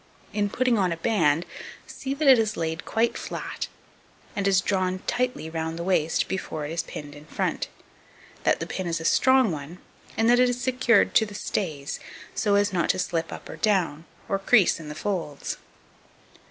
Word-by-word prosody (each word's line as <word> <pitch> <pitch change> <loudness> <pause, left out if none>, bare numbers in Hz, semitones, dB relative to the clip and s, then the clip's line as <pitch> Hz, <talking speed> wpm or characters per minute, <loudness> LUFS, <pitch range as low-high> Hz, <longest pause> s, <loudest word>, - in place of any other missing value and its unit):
In 205 -1 +1
putting 245 +1 +2
on 185 -3 +2
a 165 - -2
band, 165 -5 +2 0.4
see 270 0 -5
that 300 0 0
it 260 -3 +8
is 215 -1 0
laid 160 0 -2
quite 230 +1 +1
flat, - - -5 0.7
and 200 -1 0
is 195 -2 +5
drawn 185 -1 0
tightly 250 -8 -1
round 160 0 -3
the 170 - -3
waist 165 -3 +1
before 160 -5 -3
it 150 - -5
is 165 0 0
pinned 145 -3 -8
in 145 +1 -12
front; - - -1 0.7
that - - +2
the - - -3
pin 185 -2 -4
is 165 -1 -1
a 165 - -6
strong 260 +2 +4
one, 155 +3 -6 0.4
and 225 - +3
that 245 +1 +6
it 250 0 +5
is 245 0 -2
secured 245 -3 +3
to 220 - +5
the 205 - -10
stays, 155 -9 -3 0.3
so 205 -2 +2
as 200 -1 +2
not 175 -2 +1
to - - +3
slip 165 -2 -1
up - - -8
or - - -8
down, 175 -7 +1 0.2
or 195 - 0
crease 195 -2 +4
in 155 -2 -8
the 150 - -6
folds. 170 -6 -3
190 Hz, 195 wpm, -26 LUFS, 165-225 Hz, 0.7 s, it